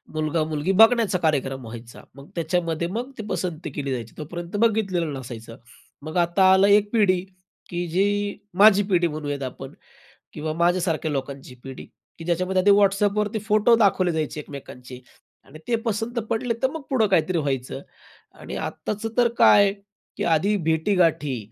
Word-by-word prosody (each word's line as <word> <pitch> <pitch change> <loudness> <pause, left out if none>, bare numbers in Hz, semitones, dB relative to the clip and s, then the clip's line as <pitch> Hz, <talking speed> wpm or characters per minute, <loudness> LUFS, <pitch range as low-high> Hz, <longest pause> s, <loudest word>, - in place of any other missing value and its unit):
मुलगा-मुलगी 155 +2 -1
बघण्याचा 225 -1 +4
कार्यक्रम 135 -5 -1
व्हायचा. 115 +1 -10
मग 140 +1 -14
त्याच्यामध्ये 170 0 -1
मग 240 +7 -4
ती 220 - -5
पसंती 175 -3 -3
केली 140 -2 -4
जायची. 120 -3 -5
तोपर्यंत 170 +4 -7
बघितलेलं 200 -7 +1
नसायचं. 115 -2 -9 0.5
मग 155 +3 -5
आता 175 +2 +4
आला 195 +1 +5
एक 205 0 +4
पिढी, 200 -5 +3 0.5
की 175 0 -3
जी, 205 +4 0 0.2
माझी 205 +1 +6
पिढी 175 -1 +3
म्हणूयात 145 -3 -4
आपण 135 +1 -7 0.6
किंवा 155 +1 -4
माझ्यासारख्या 170 -2 0
लोकांची 135 -2 -5
पिढी, 135 -1 -8 0.3
की 165 - -9
ज्याच्यामध्ये 185 +3 +2
Whatsappवरती 205 +1 +2
फोटो 215 +2 +4
दाखवले 195 -5 +2
जायचे 155 -1 -3
एकमेकांचे 130 -3 -10 0.4
आणि 155 - -14
ते 235 - +2
पसंत 225 +2 -2
पडले 230 +1 -1
तर 265 - +2
मग 320 - -6
पुढे 235 -5 +3
काहीतरी 185 -1 +1
व्हायचं. 135 -4 -3 0.5
आणि - - -9
आत्ताचं 210 +2 -4
तर 240 -1 +5
काय, 200 -1 +6 0.4
की - - -2
आधी 180 +6 +2
भेटी-गाठी 160 -4 +1
175 Hz, 145 wpm, -23 LUFS, 150-205 Hz, 0.6 s, माझी